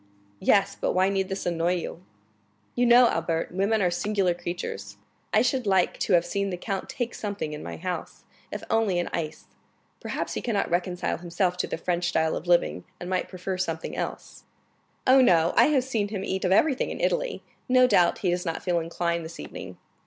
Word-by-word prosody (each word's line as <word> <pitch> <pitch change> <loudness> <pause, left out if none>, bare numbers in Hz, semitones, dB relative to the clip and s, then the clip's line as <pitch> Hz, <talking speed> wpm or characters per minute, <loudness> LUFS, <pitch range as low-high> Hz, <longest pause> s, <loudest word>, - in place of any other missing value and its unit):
"Yes; 200 0 +3
but - - +1
why 185 +1 +3
need 195 -1 -1
this 195 0 -4
annoy 175 0 +1
you?" 175 0 -5 0.7
"You 245 0 +2
know, 240 +1 +8
Albert, 165 0 -1
women 200 +3 +1
are 180 - +2
singular 190 0 +1
creatures. 175 0 -6 0.3
I - - +4
should 250 -2 0
like 190 -2 +2
to - - +1
have 175 -1 +4
seen 200 +3 -1
the 180 - -3
count 195 +1 -4
take 245 -2 -3
something 200 -7 -4
in 150 - -6
my - - -6
house, 180 0 -5 0.3
if 210 - -5
only 225 -5 +2
an 175 - -2
ice. 155 -3 -4 0.5
Perhaps - - -4
he - - -3
cannot 210 -7 -1
reconcile 175 0 -1
himself 175 +1 0
to - - -1
the - - -3
French 175 +1 -1
style 160 -2 +1
of 170 - -6
living, 175 -1 +2 0.2
and 175 +1 -6
might 185 - -1
prefer 185 0 -4
something 165 -3 -3
else." - - -5 0.6
"Oh, 260 +1 +7
no; 170 -8 +4
I - - +7
have 285 -4 +3
seen 225 -6 -1
him 200 -2 -4
eat 190 0 -2
of 185 - +1
everything 265 +7 +3
in - - -5
Italy; - - -1 0.3
no 255 0 +6
doubt 180 -8 +4
he 180 - +3
does 175 0 -1
not 165 -2 -3
feel 175 -2 +1
inclined 170 0 -2
this 160 +1 -9
evening." - - -8
185 Hz, 200 wpm, -26 LUFS, 175-205 Hz, 0.7 s, know